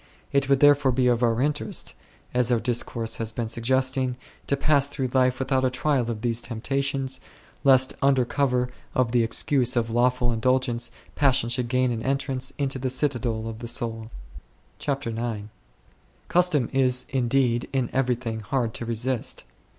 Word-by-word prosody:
It 140 0 +2
would 140 -1 +3
therefore 145 -2 +5
be 125 -1 +3
for 120 +1 +2
our 115 +2 -1
interest, 145 0 -1 0.4
as 125 0 +2
our 120 - +3
discourse 115 -1 -1
has 115 -1 -3
been 115 0 -3
suggesting, 130 +2 0 0.3
to 140 - +1
pass 140 -1 +3
through 135 -3 -3
life 130 -1 +3
without 130 0 0
a 130 - +3
trial 130 -1 0
of 110 -2 -4
these 120 -1 -1
temptations, 135 +3 -2 0.4
lest 130 -1 +5
under 135 -2 +3
cover 125 -2 0 0.2
of 125 -3 +2
the 120 0 +3
excuse 125 +2 +2
of 115 -1 0
lawful 125 +1 +2
indulgence 120 0 0 0.2
passion 135 -5 +2
should 120 0 -1
gain 125 0 +2
an 115 -1 -3
entrance 135 0 -1
into 135 -2 -2
the 130 0 -1
citadel 120 -5 -1
of 110 -1 -6
the 120 - -6
soul. 115 -1 -3 0.3
>' - - -36
CHAPTER 140 -4 -2
IX. 110 -2 -4 0.8
Custom 175 -8 +3
is 130 -1 +2
indeed 125 -2 +1
in 130 -3 0
everything 125 -3 -1
hard 115 +1 -1
to 115 - -6
resist. 120 +2 -2
125 Hz, 165 wpm, -25 LUFS, 120-135 Hz, 0.8 s, therefore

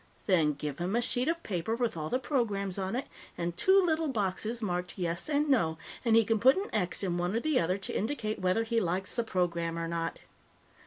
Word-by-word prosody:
Then 160 -5 +3
give 145 0 -5
him 180 +5 -1
a - - +3
sheet 245 +1 +1
of 335 +1 -1
paper 190 +3 -2
with 235 -4 -1
all 155 -1 -4
the 255 - +1
programs 205 -9 -1
on 190 +3 -2
it 260 - -2 0.3
and 170 0 -2
two 380 - +5
little 320 -1 +1
boxes 215 -1 -1
marked 180 -4 -3
Yes 170 - -2
and 295 0 +2
No, 170 - +2 0.3
and 230 -2 +4
he 225 -1 +6
can 225 0 +1
put 260 - +6
an 400 +2 -3
X 190 -2 0
in 175 -2 -1
one 175 +4 -1
or - - +2
the 305 +2 +2
other 180 +3 +1
to 195 - -4
indicate 220 -1 -2
whether 185 +5 +2
he 230 0 +1
likes 185 +1 -1
the 235 - +1
program 170 -5 -1
or 165 0 -2
not. 165 -1 -2
200 Hz, 225 wpm, -30 LUFS, 175-240 Hz, 0.3 s, he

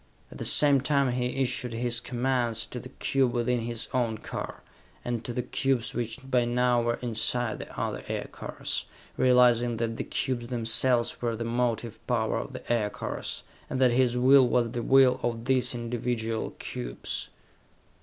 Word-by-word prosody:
At - - -11
the - - -3
same 140 -3 +6
time 140 -2 +2
he 125 0 0 0.2
issued 125 -1 -2
his 120 0 0
commands 120 -2 0
to 125 - -7
the 130 - -10
cube 135 -2 0
within 120 0 +1
his 115 0 -1
own 115 -3 0
car, - - -6 0.4
and 120 -2 -2
to 120 - -4
the 125 +1 -2
cubes 125 -1 0
which 120 -1 -3
by 125 -2 +2
now 120 0 +2
were 120 0 0
inside 120 0 -1
the - - -8
other - - -3
aircars, - - -4 0.3
realizing 120 -2 +4
that 115 0 -2
the - - -2
cubes 120 -2 -2
themselves 120 0 +2
were 120 -1 -1
the 115 - -4
motive 115 -1 -1
power 115 -3 0
of - - -6
the - - -3
aircars 105 -3 -3 0.3
and 130 - -2
that 130 -2 +5
his 125 0 +2
will 130 +1 +6
was 120 -1 +1
the 120 -1 -3
will 130 +1 +5
of 115 -1 -2
these 130 -1 +2
individual 115 -1 -3
cubes. - - -5
120 Hz, 165 wpm, -28 LUFS, 115-125 Hz, 0.4 s, same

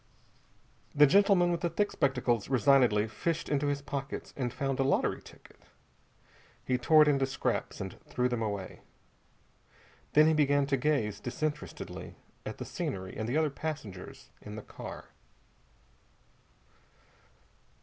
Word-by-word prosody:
The 145 0 +8
gentleman 190 +1 +4
with 170 - -1
the 170 - 0
thick 205 +5 0
spectacles 125 -6 0
resignedly 125 -4 +4
fished 165 +8 -2
into 145 0 0
his 140 0 -1
pockets 140 -1 -5
and 125 -3 -2
found 135 +1 -2
a - - +4
lottery 135 - +1
ticket. - - -17 1.0
He 125 -1 +1
tore 155 +4 +6
it - - 0
into 135 -2 +3
scraps 135 - -2
and - - -6
threw 125 0 0
them 120 -2 -2
away. 100 -4 -4 1.3
Then 150 +1 +7
he 160 - +4
began 145 -2 +3
to 140 0 +1
gaze 125 -7 0
disinterestedly 150 +4 -5 0.3
at - - -5
the - - -6
scenery 95 -1 -4
and 110 +1 -3
the 135 - +1
other 155 -2 +2
passengers 140 -12 -7
in 105 0 -8
the 110 - -7
car. - - -9
140 Hz, 140 wpm, -30 LUFS, 120-150 Hz, 1.3 s, The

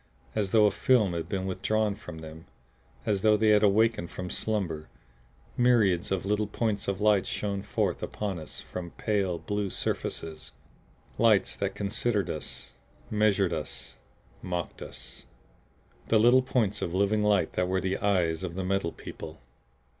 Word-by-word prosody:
As 105 -3 0
though 110 +1 +5
a 105 - +4
film 110 -8 +3
had 85 -1 -4
been 95 -1 -2
withdrawn 100 +3 0
from 80 -4 -9
them, 80 +1 -10 0.6
as 100 -3 +1
though 110 -1 +5
they 110 +1 +3
had 105 -1 +6
awakened 105 -3 +3
from 90 -1 -6
slumber, 85 -8 -2 0.7
myriads 110 -9 +3
of 95 -1 -1
little 105 +1 +1
points 105 -1 -1
of 100 -1 -1
light 105 -2 +3
shone 100 -1 -2
forth 100 -2 -1
upon 100 -4 -3
us 80 - -7
from 90 - -6
the - - -12
pale 100 -5 +1
blue 100 +4 -2
surfaces 80 -3 -4 0.7
lights 110 -4 +4
that 100 -1 -2
considered 100 -1 0
us, 75 - -6 0.4
measured 105 -4 +2
us 80 -2 -5 0.5
mocked 90 -2 -4
us. - - -8 0.8
The 115 - +4
little 120 +4 +6
points 120 -6 0
of 85 - -2
living 100 +2 +2
light 105 -2 +2
that 90 - 0
were 95 +1 +1
the 95 +1 -1
eyes 90 -6 +1
of 90 -2 -5
the 95 - -2
Metal 95 -2 0
People! 80 0 -9
100 Hz, 160 wpm, -28 LUFS, 90-105 Hz, 0.8 s, had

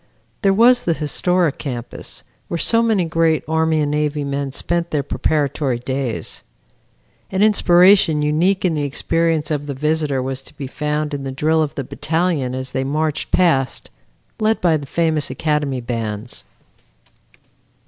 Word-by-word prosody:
There 195 -3 +4
was 240 +5 +4
the 170 - +2
historic 165 +1 0
campus, 125 -4 -6 0.2
where 170 - -3
so 230 +7 +3
many 220 -6 +2
great 165 -1 +1
Army 160 0 +1
and 145 -1 0
Navy 150 0 -1
men 140 0 -3
spent 170 +5 -1
their 150 -3 -1
preparatory 140 -3 0
days. 130 -1 -3 0.9
An 190 +1 +1
inspiration 180 -6 +5
unique 175 +6 +1
in 175 - +2
the 150 - -1
experience 160 +2 0
of 145 -1 -2
the 140 - -4
visitor 150 -1 0
was 130 +1 -3
to - - -14
be 140 - -5
found 150 +2 -2
in 140 -1 -4
the 135 - -4
drill 155 +4 +1
of 150 -2 -2
the 140 - -3
battalion 160 -2 -1
as 130 0 -4
they 130 - -1
marched 150 +2 -1
past, 140 -8 +1 0.5
led 220 0 +1
by 170 -3 +3
the 145 -2 -4
famous 160 -1 +1
academy 150 -4 -1
bands. 115 -1 -5
150 Hz, 155 wpm, -19 LUFS, 140-170 Hz, 0.9 s, inspiration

